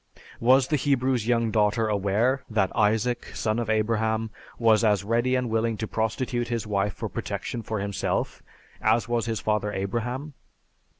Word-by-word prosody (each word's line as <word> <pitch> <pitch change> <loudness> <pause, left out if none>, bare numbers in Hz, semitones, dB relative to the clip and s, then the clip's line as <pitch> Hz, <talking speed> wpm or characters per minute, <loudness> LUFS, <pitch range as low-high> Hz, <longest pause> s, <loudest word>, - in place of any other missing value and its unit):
Was 130 +2 +4
the 150 - +2
Hebrew's 130 -4 +1
young 115 -2 +2
daughter 105 +1 +2
aware 105 +6 +1
that 105 -4 +1
Isaac, 110 +2 +1
son 110 +1 0
of 115 -2 -3
Abraham, 110 0 0 0.3
was 115 -1 +4
as 105 -3 +3
ready 120 +4 +1
and 125 -1 0
willing 115 0 0
to 110 - -3
prostitute 120 +2 -1
his 115 -2 -2
wife 100 -1 0
for - - -4
protection 120 - -4
for 110 -1 -3
himself 100 0 -2 0.4
as 110 +3 +2
was 120 -1 0
his 110 -2 -1
father 105 -1 0
Abraham? 120 +9 -3
115 Hz, 160 wpm, -26 LUFS, 105-120 Hz, 0.4 s, Was